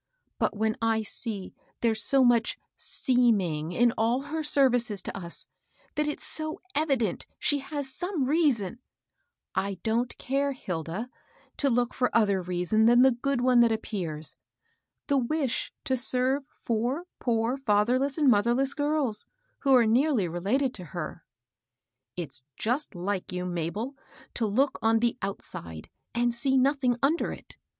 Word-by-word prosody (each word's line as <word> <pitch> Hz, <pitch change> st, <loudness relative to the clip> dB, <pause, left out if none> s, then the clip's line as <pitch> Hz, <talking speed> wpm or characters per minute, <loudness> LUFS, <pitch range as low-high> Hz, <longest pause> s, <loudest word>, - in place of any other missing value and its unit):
But^hen 220 Hz, +1 st, +1 dB
I 225 Hz, -1 st, +2 dB
see 210 Hz, -2 st, -3 dB, 0.3 s
there's 225 Hz, -2 st, +1 dB
so 270 Hz, -1 st, +4 dB
much 235 Hz, -2 st, +3 dB, 0.2 s
%eeming 200 Hz, -, +1 dB
in 235 Hz, +5 st, +3 dB
all 235 Hz, +4 st, +2 dB
her 320 Hz, -, 0 dB
services 245 Hz, -8 st, +2 dB
to -, -, -5 dB
us, 175 Hz, -3 st, -5 dB, 0.2 s
— -, -, -34 dB
that 300 Hz, 0 st, 0 dB
it's 295 Hz, -, -3 dB
so 310 Hz, 0 st, -3 dB
evident 275 Hz, -, 0 dB
she 290 Hz, -, +2 dB
has 275 Hz, -1 st, -5 dB
some 350 Hz, -3 st, -1 dB
reason 255 Hz, -, +1 dB, 0.3 s
" -, -, -51 dB
— -, -, -60 dB
"I 200 Hz, -, -4 dB
don't 235 Hz, +2 st, 0 dB
care, 275 Hz, +2 st, 0 dB
Hilda, 180 Hz, -, -4 dB, 0.5 s
to 280 Hz, -, +2 dB
look 245 Hz, 0 st, +1 dB
for 250 Hz, -, +1 dB
other 200 Hz, -4 st, +3 dB
reason 180 Hz, +5 st, +1 dB
than 240 Hz, +1 st, +6 dB
the 265 Hz, -, +6 dB
good 250 Hz, +1 st, -1 dB
one 250 Hz, -1 st, +4 dB
that 235 Hz, -1 st, +5 dB
appears, 175 Hz, -9 st, -3 dB, 0.3 s
— -, -, -49 dB
the 280 Hz, -2 st, +3 dB
wish 265 Hz, 0 st, -1 dB
to 260 Hz, -, 0 dB
serve 260 Hz, +2 st, +1 dB
four 240 Hz, +8 st, -2 dB, 0.2 s
poor 230 Hz, +1 st, +1 dB
fatherless 255 Hz, +3 st, +1 dB
and 300 Hz, -3 st, +3 dB
motb^less 245 Hz, +4 st, +3 dB
girls, 290 Hz, -7 st, 0 dB, 0.3 s
who 270 Hz, -2 st, +4 dB
are 240 Hz, -2 st, +6 dB
nearly 240 Hz, -, +3 dB
related 210 Hz, +11 st, 0 dB
to 185 Hz, -, -6 dB
her." 165 Hz, 0 st, -5 dB, 0.5 s
" 125 Hz, +1 st, -60 dB
It's 155 Hz, -6 st, -5 dB, 0.2 s
just 245 Hz, +1 st, -1 dB
like 185 Hz, +2 st, -3 dB
you, 180 Hz, 0 st, -3 dB
Mabel, 180 Hz, -, -3 dB, 0.4 s
to 225 Hz, -, 0 dB
look 265 Hz, +7 st, +1 dB
on 225 Hz, 0 st, +4 dB
the 235 Hz, +2 st, 0 dB
out 195 Hz, 0 st, -3 dB
side, 80 Hz, -2 st, -8 dB, 0.2 s
and 240 Hz, 0 st, +2 dB
see 265 Hz, +3 st, +2 dB
nothing 260 Hz, -2 st, +2 dB
under 310 Hz, +5 st, +2 dB
it. -, -, -10 dB
240 Hz, 160 wpm, -28 LUFS, 205-270 Hz, 0.5 s, than